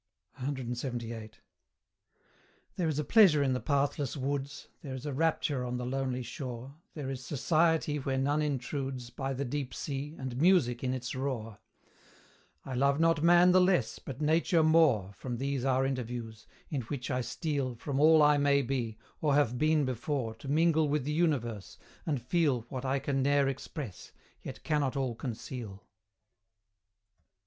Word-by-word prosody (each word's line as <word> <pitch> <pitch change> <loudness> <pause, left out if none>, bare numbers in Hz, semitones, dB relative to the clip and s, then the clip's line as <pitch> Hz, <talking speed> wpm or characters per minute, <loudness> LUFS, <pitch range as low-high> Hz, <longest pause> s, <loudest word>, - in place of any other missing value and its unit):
CLXXVIII. 120 -4 -4 1.4
There 175 - 0
is 155 -3 -1
a 150 - 0
pleasure 175 -8 +6
in 135 -2 +1
the 125 - -1
pathless 140 0 0
woods, 140 +1 -3
There 135 -3 -6
is 130 +2 -8
a 145 - -3
rapture 150 -3 0
on 125 0 -3
the 125 - -4
lonely 130 -1 -2
shore, 125 +2 -7 0.2
There 140 -4 -4
is 130 -1 -6
society 155 +1 +1
where 135 -1 -2
none 145 +3 +1
intrudes, 135 -3 -3
By 135 +2 -3
the 140 +2 -2
deep 135 0 -4
Sea, 145 +2 -4
and 130 0 -4
music 160 -10 +3
in 130 0 0
its 125 -2 -5
roar: 120 -5 -4 1.1
I 135 - -5
love 140 +3 +2
not 165 -2 +3
Man 175 +2 +6
the 185 +1 +6
less, 180 -11 +2
but 125 - -8
Nature 160 +2 +3
more, 150 - +4
From 120 +2 -5
these 135 0 -2
our 135 0 +2
interviews, 120 -4 -4 0.2
in 140 -4 -1
which 125 +2 -5
I 130 0 0
steal 140 -1 -2
From 135 +3 -3
all 155 +1 +6
I 150 0 +5
may 140 0 +3
be, 120 -4 -2 0.2
or 145 -3 +2
have 125 -4 +2
been 155 -1 +3
before, 130 -1 -2
To 135 - -11
mingle 160 +1 +3
with 150 -1 0
the 150 +3 -2
Universe, 130 - -1 0.3
and 145 -4 0
feel 135 0 +1
What 130 0 -5
I 135 +1 +1
can 135 0 -1
ne'er 140 0 +3
express, 135 - -6 0.3
yet - - -8
cannot 145 -3 0
all 130 -3 -1
conceal. 115 -3 -7
135 Hz, 160 wpm, -30 LUFS, 125-150 Hz, 1.4 s, pleasure